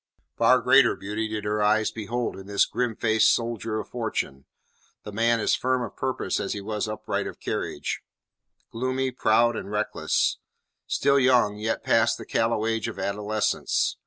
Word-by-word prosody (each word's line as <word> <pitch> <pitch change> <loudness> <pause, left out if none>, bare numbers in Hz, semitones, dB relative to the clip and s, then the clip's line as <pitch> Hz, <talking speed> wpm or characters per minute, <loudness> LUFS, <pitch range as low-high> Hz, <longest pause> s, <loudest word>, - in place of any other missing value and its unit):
Far 130 0 +4
greater 130 0 +5
beauty 105 +3 -3
did 110 -1 -4
her 105 0 -1
eyes 110 +1 +2
behold 115 +2 -3
in 95 0 -10
this 100 0 +3
grimfaced 110 -2 +2
soldier 115 -2 -1
of 105 - -7
fortune; 70 - -3 0.6
the 105 - -7
man 115 +2 +2
as - - +1
firm 130 0 +1
of - - -7
purpose 130 -1 -2
as - - -2
he 105 - -4
was 105 +2 -3
upright 110 0 -3
of - - -9
carriage; - - -3 0.7
gloomy, 130 +2 -1
proud, 120 -1 +3
and - - -5
reckless; 105 0 0 0.5
still 140 0 +3
young, 125 -5 +3
yet 110 +1 -2
past - - +3
the - - -9
callow 115 -1 0
age 115 -1 -1
of 115 - -6
adolescence. 105 +1 -1
110 Hz, 160 wpm, -25 LUFS, 105-120 Hz, 0.7 s, greater